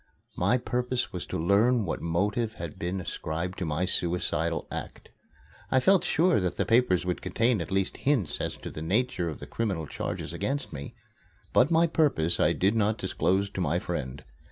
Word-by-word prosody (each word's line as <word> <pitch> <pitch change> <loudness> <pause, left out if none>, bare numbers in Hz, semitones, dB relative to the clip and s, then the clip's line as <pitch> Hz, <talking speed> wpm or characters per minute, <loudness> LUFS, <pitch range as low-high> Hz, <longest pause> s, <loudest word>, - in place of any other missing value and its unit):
My 125 - +2
purpose 125 0 -2
was 90 - -4
to - - -3
learn 105 +7 +3
what 85 - -3
motive 105 +7 0
had 85 -5 -7
been 90 +3 -2
ascribed 85 +1 -4
to 90 - -1
my 80 +3 0
suicidal 85 -3 0
act. - - -7 0.6
I 130 - +4
felt 190 +7 +4
sure 170 -3 +3
that 90 -2 -2
the - - +1
papers 115 -7 +3
would 90 -1 -2
contain 115 -3 +1
at 85 - -5
least 95 -1 0
hints 130 - 0
as - - -3
to - - -7
the 75 - -7
nature 95 0 0
of 80 - -7
the - - -7
criminal 95 -9 -2
charges - - -4
against 140 +1 -2
me. 70 -1 -7 0.6
But 125 - +5
my 165 0 +4
purpose 140 - +1
I - - +4
did 95 +3 +2
not 110 0 +2
disclose 95 +1 0
to 95 - -3
my 75 -5 +1
friend. 65 +1 -4
95 Hz, 185 wpm, -28 LUFS, 85-120 Hz, 0.6 s, But